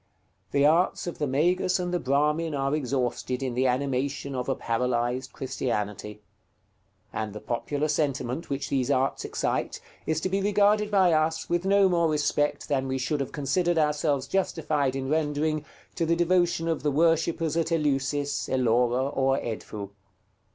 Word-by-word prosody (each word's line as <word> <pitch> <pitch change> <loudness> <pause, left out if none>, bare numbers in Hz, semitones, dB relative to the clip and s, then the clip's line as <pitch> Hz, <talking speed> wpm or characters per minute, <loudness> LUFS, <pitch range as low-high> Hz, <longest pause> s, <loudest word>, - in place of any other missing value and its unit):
The 140 0 +2
arts 165 +5 +3
of 175 - -6
the 150 - 0
Magus 175 +7 +2
and 180 -1 -3
the 175 - +1
Brahmin 150 +3 +1
are 135 0 0
exhausted 130 -2 -1
in 130 -2 -2
the 130 +2 +2
animation 135 +2 -1
of 125 0 -3
a 135 - +1
paralyzed 120 +2 -1
Christianity; 105 -5 -4 0.9
and 110 -2 -3
the 105 - -6
popular 145 +7 -2
sentiment 145 -1 -1
which 140 -1 -3
these 130 -2 0
arts 135 -1 +1
excite - - -2 0.3
is 160 -1 +1
to - - 0
be 195 +1 0
regarded 205 +1 +3
by 190 -4 +4
us 160 +1 +1
with 175 +1 +1
no 200 0 +5
more 170 -3 +2
respect 150 -1 0
than 135 -2 0
we 130 0 -1
should 140 +3 -1
have 135 - -3
considered 170 +5 0
ourselves 150 -2 +1
justified 155 -7 0
in 135 -1 -3
rendering 155 0 0 0.3
to 165 - -1
the 170 - +3
devotion 175 -1 +2
of 165 -1 -1
the 150 - +1
worshippers 165 +1 +1
at 165 0 0
Eleusis, 145 -2 0
Ellora, 125 0 +2
or 135 0 +2
Edfou. 105 -4 -5
145 Hz, 160 wpm, -27 LUFS, 130-165 Hz, 0.9 s, no